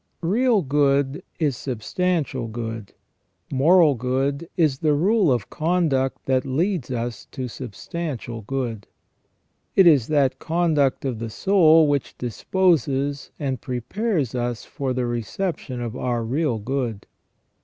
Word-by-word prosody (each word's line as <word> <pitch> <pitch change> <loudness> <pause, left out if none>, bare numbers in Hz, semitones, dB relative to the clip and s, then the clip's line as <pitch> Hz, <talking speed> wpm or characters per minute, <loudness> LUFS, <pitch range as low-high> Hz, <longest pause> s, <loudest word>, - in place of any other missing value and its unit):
Real 220 +3 +2
good 140 0 +1 0.2
is 150 -5 +1
substantial 135 +2 -2
good; 115 -2 -6 0.6
moral 155 +3 +5
good 135 +6 -1
is 150 -6 +2
the 150 -2 +2
rule 190 +1 +3
of 120 -5 -1
conduct 155 -6 0
that 130 -1 +2
leads 160 +2 -1
us 120 -2 -4
to 130 -3 -5
substantial 125 - -6
good. 115 -2 -4 0.9
It 190 - +7
is 145 -9 +5
that 145 -4 +2
conduct 155 -5 +1
of 125 -5 -2
the 115 0 -4
soul 165 - +5
which 145 -2 -1
disposes 140 - 0
and 135 -5 -3
prepares 145 - -2
us 120 -2 -3
for 135 -2 -3
the 125 -1 -1
reception 125 - -3
of 120 -1 -4
our 120 -2 -1
real 130 +1 0
good. 115 -2 -3
135 Hz, 125 wpm, -23 LUFS, 120-165 Hz, 0.9 s, It